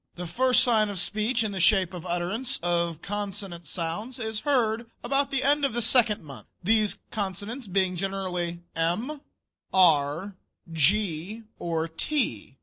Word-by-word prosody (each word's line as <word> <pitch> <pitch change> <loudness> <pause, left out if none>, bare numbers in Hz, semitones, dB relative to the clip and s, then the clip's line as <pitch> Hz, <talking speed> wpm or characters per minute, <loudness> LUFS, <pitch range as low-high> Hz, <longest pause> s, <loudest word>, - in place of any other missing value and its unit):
The 180 - -6
first 255 +8 +4
sign 220 -4 +3
of 200 - -5
speech 215 +5 0
in 215 - -2
the 195 - -4
shape 190 -1 +4
of 180 0 -7
utterance 215 +10 -1
of 170 -2 -1
consonant 195 -4 -4
sounds 180 - -3
is 220 -3 -3
heard 235 -4 0
about 275 +3 +1
the 270 -1 -1
end 290 +1 +3
of 275 - +1
the 240 - -1
second 220 -5 +4
month, 140 -4 -11 0.2
these 215 +2 +2
consonants 205 +4 -4
being 190 -1 +1
generally 180 -2 -3
"m," 215 - -1 0.5
"r," 165 +1 +3 0.4
"g," 185 +5 +1 0.2
or 165 -1 -2
"t." 160 - -2
200 Hz, 145 wpm, -26 LUFS, 175-230 Hz, 0.5 s, first